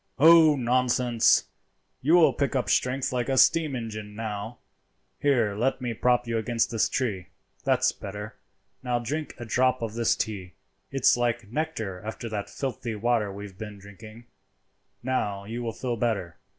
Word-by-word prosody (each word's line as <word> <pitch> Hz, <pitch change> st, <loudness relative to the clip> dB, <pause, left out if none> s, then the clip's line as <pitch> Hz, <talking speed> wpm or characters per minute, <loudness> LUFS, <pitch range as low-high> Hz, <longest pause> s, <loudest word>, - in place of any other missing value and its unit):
"Oh, 160 Hz, +1 st, +7 dB
nonsense! 125 Hz, -2 st, +3 dB, 0.6 s
you 155 Hz, +6 st, +4 dB
will 170 Hz, -2 st, +6 dB
pick 140 Hz, -1 st, -1 dB
up 125 Hz, -, 0 dB
strength 130 Hz, +1 st, +1 dB
like 125 Hz, 0 st, -1 dB
a 135 Hz, -, +1 dB
steam 155 Hz, 0 st, +4 dB
engine 110 Hz, -3 st, -6 dB
now. 110 Hz, +1 st, -5 dB, 0.6 s
Here, 120 Hz, -8 st, +2 dB
let 125 Hz, +7 st, 0 dB
me 125 Hz, -2 st, -3 dB
prop 125 Hz, +2 st, +2 dB
you 115 Hz, -1 st, -1 dB
against 115 Hz, 0 st, 0 dB
this 115 Hz, -2 st, +1 dB
tree. 100 Hz, -9 st, -2 dB, 0.4 s
That's -, -, +3 dB
better. 105 Hz, +2 st, -8 dB, 0.5 s
Now 125 Hz, -1 st, 0 dB
drink 145 Hz, +6 st, -4 dB
a 120 Hz, -, -7 dB
drop 130 Hz, +2 st, +1 dB
of 110 Hz, -2 st, -3 dB
this 115 Hz, 0 st, +2 dB
tea; 95 Hz, -4 st, -4 dB, 0.4 s
it's 135 Hz, -2 st, +3 dB
like 120 Hz, -3 st, -1 dB
nectar 120 Hz, -, -3 dB
after 110 Hz, +2 st, -6 dB
that 105 Hz, -2 st, -4 dB
filthy 120 Hz, -4 st, -4 dB
water 110 Hz, -1 st, 0 dB
we 100 Hz, +1 st, -7 dB
have 95 Hz, -2 st, -13 dB
been 105 Hz, -2 st, -7 dB
drinking. 110 Hz, +4 st, -13 dB, 0.8 s
Now 105 Hz, -6 st, -1 dB
you 115 Hz, +3 st, -5 dB
will 115 Hz, -1 st, -2 dB
feel 120 Hz, +1 st, -3 dB
better. 105 Hz, -7 st, -2 dB
120 Hz, 165 wpm, -26 LUFS, 105-130 Hz, 0.8 s, Oh